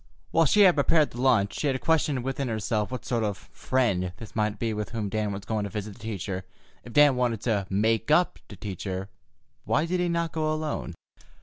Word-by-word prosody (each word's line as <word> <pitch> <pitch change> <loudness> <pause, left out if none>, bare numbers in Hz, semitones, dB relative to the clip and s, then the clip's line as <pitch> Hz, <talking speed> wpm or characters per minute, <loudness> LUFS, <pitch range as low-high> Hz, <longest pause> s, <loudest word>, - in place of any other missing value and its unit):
While 165 -1 +4
she 210 - +4
had 185 -3 +8
prepared 150 +1 +3
the 120 - -6
lunch, 120 -7 +2
she 150 - 0
had 130 -2 0
questioned 150 -5 +1
within 135 +1 -2
herself 110 -1 -1
what 130 - -5
sort 120 -3 0
of 105 -2 -1
"friend" 100 -6 -1
this 110 -5 -11
might 105 -1 0
be 115 +1 -1
with 105 -1 -3
whom 110 -3 -3
Dan 105 0 -1
was 100 0 -6
going 110 -1 -1
to - - -4
visit 105 -1 -5
the - - -18
teacher. 100 -4 -4 0.4
If 120 - -11
Dan 145 -2 +6
wanted 120 -4 0
to 105 -5 0
"make 110 +5 +1
up" 175 +4 +3
to 105 - -9
Teacher, 95 0 -5 0.5
why 155 - +1
did 180 +2 -1
he 180 0 +1
not 170 -1 0
go 155 -1 0
alone? 155 - -3
115 Hz, 215 wpm, -27 LUFS, 105-145 Hz, 0.5 s, had